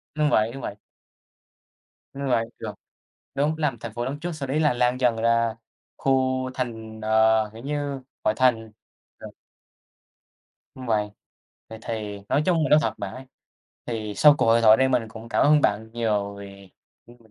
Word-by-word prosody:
Đúng 150 -1 +2
vậy, 110 -5 +2
đúng 135 - -8
vậy. 100 - -5 1.4
Đúng 140 0 -4
vậy, 115 -2 +2
được. 105 -2 -5 0.6
Đúng, 150 +3 +1
làm 150 -6 -1
thành 115 -1 -7
phố 120 +1 -3
lớn 140 +3 -4
trước, 175 - -3
sau 145 -5 -5
đấy 145 +4 0
là 150 -5 +3
lan 125 +1 +1
dần 125 -3 +2
ra 115 0 +1 0.4
khu 130 -1 +1
thành 110 -3 -5
ờ, 110 0 +3
kiểu 115 +2 -11
như, 145 -1 -3 0.2
ngoại 110 - +1
thành, 115 -4 +2 0.5
ờ. - - -9 1.5
Đúng 130 -1 -9
vậy. 105 -2 +1 0.6
Vậy 110 0 -9
thì 105 -3 -5
nói 145 - +2
chung 170 -4 +2
là - - -1
nói 150 - +6
thật - - -1
bạn 100 -1 -5
ấy, 130 +1 -10 0.6
thì 110 -3 -4
sau 150 +6 +7
cuộc - - +1
hội 115 +1 +4
thoại 110 0 +7
đây 130 0 +3
mình 125 -3 +1
cũng 110 +1 -11
cảm - - +2
ơn 150 0 +5
bạn 105 +2 0
nhiều 105 -4 -1
vì, 100 -1 -12 0.4
ừm, 120 +1 -17
115 Hz, 180 wpm, -24 LUFS, 110-135 Hz, 1.5 s, sau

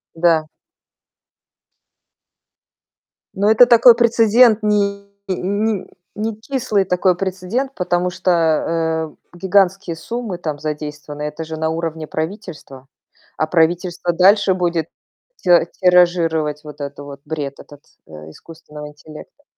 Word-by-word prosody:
Да. 165 -2 +2 2.9
Но 200 +2 +1
это 225 +3 +7
такой 235 0 +7
прецедент, 230 -1 +4
не 200 -1 -1 0.2
не 200 +2 -2 0.3
некислый 220 0 -2
такой 180 0 +1
прецедент, 195 +9 -3
потому 180 0 -1
что, 185 0 -1 1.0
э, - - -14
гигантские 190 -1 +1
суммы 230 0 -5
там 155 -4 -5
задействованы. 150 -1 -6
Это 150 +2 -5
же 160 0 -7
на 160 0 -1
уровне 160 -1 -4
правительства. 160 -6 -7 0.5
А 155 - 0
правительство 175 +1 0
дальше 195 +2 +4
будет 170 -3 -1 0.5
ти - - -6 0.3
тиражировать 170 -5 +2
вот 150 -1 -11
этот 140 0 -7
вот 140 -1 -10
бред, 145 -3 -5
этот, 145 -1 -14 0.3
э, - - -18 0.2
искусственного 150 - -12
интеллекта. 155 - -14
175 Hz, 110 wpm, -19 LUFS, 155-200 Hz, 2.9 s, это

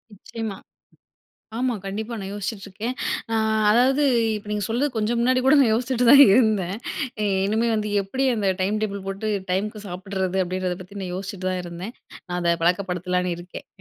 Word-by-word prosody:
நிச்சியமா. 220 0 -6 1.0
ஆமா 250 -1 0
கண்டிப்பா, 220 +4 -4
நான் 195 +1 -6
யோசிச்சுட்ருக்கேன். 205 +3 -5 0.4
ஆ - - +2 0.3
அதாவது, 260 +6 +4 0.3
இப்ப 210 0 -7
நீங்க 210 -1 -1
சொல்றது 250 +6 0
கொஞ்சம் 225 +2 0
முன்னாடி 255 +2 +3
கூட 270 +3 +6
நான் 235 -5 +4
யோசிச்சிட்டு 250 +1 0
தான் 280 0 +10
இருந்தேன். 205 -6 +2 0.7
இனிமே 220 +3 +1
வந்து 210 -1 -2
எப்டி 260 +8 -2
அந்த 205 -3 0
டைம் 205 +3 0
டேபிள் 200 -2 -4
போட்டு 195 +3 -3 0.2
டைமுக்கு 210 +3 -2
சாப்பிடறது 190 +1 -3
அப்டின்றத 180 0 -2
பத்தி 200 +2 -10
நான் 180 -2 -4
யோசிச்சிட்டு 190 -1 -5
தான் 185 -1 -2
இருந்தேன். 175 +6 -7 0.3
நான் 180 0 -2
அத 170 0 +3
பழக்கப்படுத்தலாம்னு 180 0 0
இருக்கேன், 175 +1 -10
200 Hz, 155 wpm, -23 LUFS, 185-230 Hz, 1.0 s, தான்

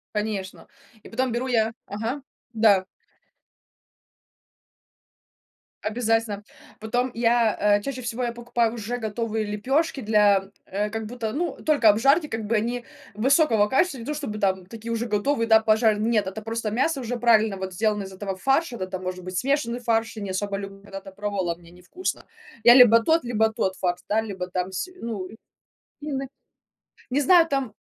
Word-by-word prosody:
Конечно, 210 -3 -4 0.4
и - - -12
потом 255 +2 -1
беру 240 +3 -2
я 225 -3 +1
ага, 225 +7 -4 0.3
да. 210 -4 +4 3.0
Обязательно. 225 -2 0 0.4
Потом 245 +4 -1
я, 230 -1 +2 0.2
э, - - -6
чаще 255 +2 -5
всего 240 +1 -3
я 235 -1 -1
покупаю 235 -1 0
уже 235 +1 -4
готовые 220 -1 -2
лепёшки 265 +8 -1
для, 205 -3 +3 0.2
э, 205 +2 -2
как 225 +1 -4
будто, 225 -1 -4
ну, 340 +7 -2
только 295 -7 +4
обжарьте, 275 +10 +4
как 225 -5 -4
бы 225 +3 0
они 235 +3 -1 0.3
высокого 230 -1 +3
качества, 270 +5 +1
не - - -7
то 300 - -2
чтобы 275 -8 -5
там 190 -2 0
такие 225 +3 -8
уже 230 0 -1
готовые, 230 +3 0
да, 220 -1 +6
пожарь. 220 -1 +3
Нет, 215 -2 +1
это 195 +3 -5
просто 225 0 -3
мясо 270 +7 0
уже 245 -1 -3
правильно 220 -3 +3
вот 190 -1 -5
сделано 210 +1 0
из 195 - -9
этого 195 0 -5
фарша, 270 - +1
да, 185 - -4
там 185 0 -6
может 185 0 -5
быть 185 0 -5
смешанный 260 -2 0
фарш, 225 -2 0
я - - -5
не 195 - -4
особо 200 +1 -2
люблю, 195 0 -8
когда-то 195 -1 -9
пробовала, 195 -4 -2
мне 170 0 -18
невкусно. 180 - -5 0.4
Я 240 - +9
либо 235 -3 +8
тот, 320 +7 +2
либо 220 -2 +1
тот 190 -3 -1
фарш, 180 -1 -1
да, 215 - +2
либо 190 -4 -5
там 185 +1 -3
с 190 - -3
ну, 205 -6 -4 0.7
ины, 275 -2 -4 0.8
не 270 +3 +1
знаю 335 +3 +6
там, 270 -6 -1
220 Hz, 170 wpm, -24 LUFS, 205-245 Hz, 3.0 s, Я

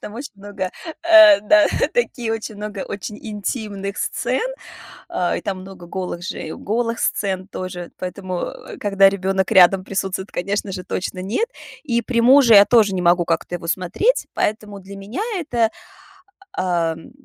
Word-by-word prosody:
там 210 - -9
очень 265 +5 -7
много 195 -2 -5 1.2
таких 245 - -1
очень 220 -1 -5
много 210 -1 -6
очень 210 +1 -6
интимных 205 -2 -4
сцен. - - -1 0.7
А, 175 -1 -1
и - - -3
там 190 -2 -4
много 190 -2 -11
голых 180 -1 -5
же - - -5
и 155 - -6
голых 230 +2 -2
сцен 190 -2 -1
тоже, 180 -2 -7
поэтому, 185 0 -4
э, - - -10
когда 195 -1 +4
ребёнок 190 -1 -1
рядом 185 -1 +6
присутствует, 195 0 -3
конечно 200 +2 -2
же, 185 -1 -6
точно 185 0 -4
нет. 230 - -1 0.4
И 235 -4 0
при 235 0 0
муже 255 -1 +7
я 200 0 +9
тоже 210 -3 +4
не 180 - -1
могу 175 0 +4
как-то 165 +1 -2
его 165 - -9
смотреть, 185 - 0
поэтому 210 -1 -2
для 195 +1 -11
меня 200 - -5
это, 240 -10 0 0.8
ам, 165 -3 -2
195 Hz, 155 wpm, -20 LUFS, 185-220 Hz, 1.2 s, я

